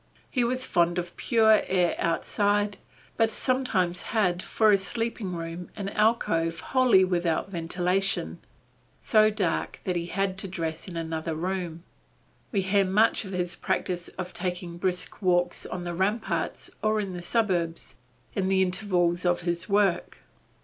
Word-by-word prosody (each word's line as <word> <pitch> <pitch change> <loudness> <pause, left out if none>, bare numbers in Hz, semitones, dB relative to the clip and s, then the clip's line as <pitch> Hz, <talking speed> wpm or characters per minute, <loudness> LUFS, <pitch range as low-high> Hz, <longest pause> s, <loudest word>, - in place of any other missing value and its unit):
He 250 - +1
was 255 +2 0
fond 175 0 +2
of 175 0 -4
pure 220 -3 +4
air 180 -2 +2
outside, 205 +4 +1 0.4
but 225 0 +3
sometimes 215 -8 0 0.2
had 180 -4 +2
for 220 +2 +3
a 200 - +6
sleeping 210 -1 -2
room 165 +1 -6
an 200 -2 -4
alcove 165 -7 +1
wholly 245 -8 +5
without 175 0 0
ventilation, 180 +3 -1 0.6
so 215 -1 +4
dark 205 -6 -1
that 185 - -1
he 170 0 -2
had 195 +1 -1
to 195 - 0
dress 165 -3 -4
in 175 -2 -6
another 160 0 -3
room. 175 -1 -3 0.7
We 200 - +1
hear 195 +1 +3
much 210 +4 +2
of 190 - -7
his 180 -1 -2
practice 175 -1 -2
of 180 -1 -5
taking 180 -1 -4
brisk 180 +2 -2
walks 175 -2 +1
on 180 - -5
the 175 0 -4
ramparts 205 +6 -1
or 215 0 +2
in 195 -3 -3
the 175 - -6
suburbs, 175 -5 -1 0.4
in 190 -2 0
the 190 0 +4
intervals 180 -2 +1
of 175 -1 +2
his 170 +2 -2
work. 200 -3 +1
185 Hz, 150 wpm, -27 LUFS, 175-205 Hz, 0.7 s, a